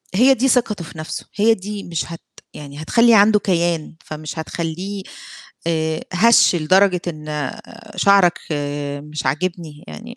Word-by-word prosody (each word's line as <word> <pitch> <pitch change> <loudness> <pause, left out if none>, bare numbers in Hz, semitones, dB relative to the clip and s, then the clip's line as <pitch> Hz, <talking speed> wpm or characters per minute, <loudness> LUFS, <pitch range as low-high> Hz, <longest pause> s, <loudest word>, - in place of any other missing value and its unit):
هي 260 +5 +6
دي 265 +2 +1
ثقته 230 -8 +1
في 160 - -12
نَفسه، 155 - -6
هي 220 +2 +4
دي 205 0 -6
مش 165 -2 -3
هت 165 - -9 0.3
يعني 145 0 -9
هتخلّي 230 +8 +4
عنده 210 +1 +5
كيان 170 -4 -1
فمش 155 +1 -7
هتخلّيه 180 +5 -5 0.6
آآ 160 -1 -1
هَش 220 -1 +5
لدرجة 180 +3 +3
إن 150 -3 -4 0.4
شعرك 200 -3 +4 0.6
مش 150 0 -6
عاجبني، 160 +1 -3
يعني 235 +2 -10
175 Hz, 135 wpm, -19 LUFS, 155-205 Hz, 0.6 s, هي